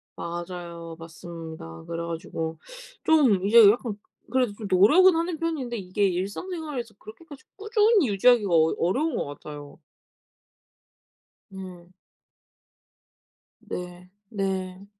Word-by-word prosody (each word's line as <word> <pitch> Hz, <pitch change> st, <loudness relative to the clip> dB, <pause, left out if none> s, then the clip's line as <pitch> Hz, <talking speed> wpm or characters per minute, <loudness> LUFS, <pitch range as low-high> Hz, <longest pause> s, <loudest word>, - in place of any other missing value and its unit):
맞아요. 170 Hz, -1 st, -7 dB
맞습니다. 160 Hz, -, -9 dB
그래 170 Hz, 0 st, -4 dB
가지고 165 Hz, -1 st, -5 dB, 0.4 s
좀 250 Hz, -12 st, +4 dB
이제 220 Hz, 0 st, +8 dB
약간 230 Hz, -2 st, -4 dB, 0.3 s
그래도 250 Hz, -5 st, +1 dB
좀 210 Hz, -1 st, -7 dB
노력은 310 Hz, -, +6 dB
하는 335 Hz, 0 st, -1 dB
편인데 280 Hz, -8 st, -2 dB
이게 195 Hz, +1 st, 0 dB
일상생활에서 240 Hz, -, -4 dB
그렇게까지 285 Hz, +4 st, -13 dB
꾸준히 425 Hz, -, +3 dB
유지하기가 210 Hz, 0 st, +4 dB
어 160 Hz, 0 st, +4 dB
어려운 270 Hz, -, 0 dB
것 -, -, -1 dB
같아요. 145 Hz, +1 st, -10 dB, 1.7 s
네. 185 Hz, -2 st, -11 dB, 1.7 s
네. 180 Hz, 0 st, -8 dB, 0.2 s
네. 190 Hz, -2 st, -3 dB
195 Hz, 245 characters per minute, -25 LUFS, 170-260 Hz, 1.7 s, 이제